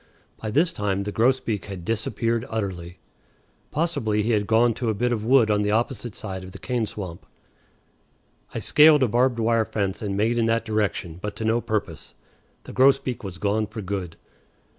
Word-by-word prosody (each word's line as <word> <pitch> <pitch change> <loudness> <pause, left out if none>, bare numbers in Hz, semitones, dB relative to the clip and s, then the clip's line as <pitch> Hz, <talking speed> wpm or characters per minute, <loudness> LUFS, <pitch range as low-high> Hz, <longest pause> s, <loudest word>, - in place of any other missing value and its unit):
By 110 - -5
this 155 +10 +2
time 100 -1 -1
the 105 - -4
grosbeak 115 -3 +1
had 95 -4 -8
disappeared 115 +1 -1
utterly. 90 -5 -4 0.7
Possibly 140 -10 0
he 115 - 0
had 105 -2 +1
gone 115 +1 +4
to 120 +1 -2
a 110 - 0
bit 120 +4 0
of 110 -3 -3
wood 115 -2 +4
on 105 0 +2
the 105 - 0
opposite 115 0 -1
side 95 -3 -6
of 95 0 -10
the - - -8
cane 120 -3 -2
swamp. 90 -6 -7 1.3
I - - -5
scaled 150 -2 +6
a - - +3
barbed 120 +2 +2
wire 115 0 +2
fence 100 -2 -2
and 100 -2 -2
made 115 +3 +1
in 115 - +2
that 115 0 +1
direction, 105 -6 -2
but 105 +1 -4
to 110 - -4
no 115 +2 +2
purpose. 105 -8 -3 0.5
The - - -10
grosbeak 130 -2 +3
was 95 -3 -6
gone 105 +2 0
for 110 0 -7
good. 95 -3 -4
110 Hz, 185 wpm, -24 LUFS, 100-120 Hz, 1.3 s, scaled